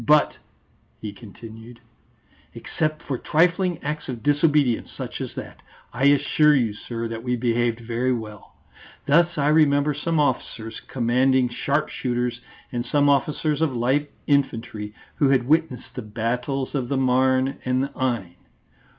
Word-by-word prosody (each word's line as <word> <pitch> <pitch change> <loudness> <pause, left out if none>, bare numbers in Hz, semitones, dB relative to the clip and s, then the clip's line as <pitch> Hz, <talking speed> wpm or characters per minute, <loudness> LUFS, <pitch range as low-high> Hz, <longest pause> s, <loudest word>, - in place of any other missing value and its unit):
But," 150 0 +4 0.6
he 105 -2 -6
continued, 115 +2 -12 0.8
"except 155 0 -3
for 130 -3 -3
trifling 180 +2 +2
acts 150 0 -4
of 120 -3 -5
disobedience 145 -4 +2
such - - -6
as - - -6
that, - - -8 0.3
I 125 +3 0
assure 150 +2 +4
you, 115 -6 +1
sir, 115 +2 -5
that 115 0 -5
we 125 +1 -1
behaved 120 -1 0
very 120 +2 -1
well. 110 -4 -6 0.5
Thus 170 +4 +3
I 145 0 +2
remember 150 -1 +4
some 160 +3 -1
officers 120 -5 -2
commanding 130 +1 +2
sharp 140 +5 -1
shooters 125 -1 -2 0.3
and 120 -1 -2
some 145 +3 +2
officers 145 +2 +1
of 150 -6 +1
light 135 +5 +1 0.2
infantry, 115 -7 -1 0.2
who 140 - +3
had 130 -3 +2
witnessed 155 -4 0
the 125 - -5
Battles 125 +5 -3
of 130 -4 -2
the 140 - 0
Marne 130 +1 +2
and 130 +1 +1
the 140 - -3
Aisne. 115 -12 -3
130 Hz, 145 wpm, -23 LUFS, 120-145 Hz, 0.8 s, But